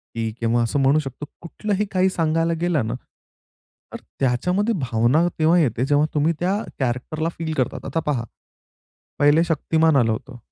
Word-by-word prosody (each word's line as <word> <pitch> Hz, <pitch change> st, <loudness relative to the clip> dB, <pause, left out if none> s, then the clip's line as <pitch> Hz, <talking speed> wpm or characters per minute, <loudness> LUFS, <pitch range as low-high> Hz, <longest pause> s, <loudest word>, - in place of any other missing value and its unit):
की 115 Hz, -1 st, -2 dB
किंवा 115 Hz, +1 st, +1 dB
असं 115 Hz, +5 st, -1 dB
म्हणू 135 Hz, +3 st, +4 dB
शकतो 135 Hz, 0 st, -6 dB, 0.2 s
कुठलंही 205 Hz, +4 st, -2 dB
काही 185 Hz, 0 st, +2 dB
सांगायला 165 Hz, -1 st, 0 dB
गेलं 165 Hz, -9 st, +1 dB
ना, 115 Hz, -, -2 dB, 1.0 s
तर -, -, -4 dB, 0.2 s
त्याच्यामध्ये 180 Hz, -, +1 dB
भावना 125 Hz, +6 st, +2 dB
तेव्हा 160 Hz, +3 st, +4 dB
येते 125 Hz, -4 st, +1 dB
जेव्हा 145 Hz, +2 st, +3 dB
तुम्ही 155 Hz, +3 st, +2 dB
त्या 185 Hz, +3 st, +1 dB, 0.2 s
कॅरेक्टरला 135 Hz, +5 st, -2 dB
फील 160 Hz, -1 st, -3 dB
करतात. 130 Hz, -, -2 dB
आता 165 Hz, -, -2 dB
पहा. 135 Hz, -6 st, 0 dB, 1.0 s
पहिले 145 Hz, +3 st, +5 dB
शक्तिमान 160 Hz, -1 st, +1 dB
आलं 115 Hz, -4 st, +3 dB
होतं. 125 Hz, +3 st, -6 dB
150 Hz, 155 wpm, -22 LUFS, 125-165 Hz, 1.0 s, पहिले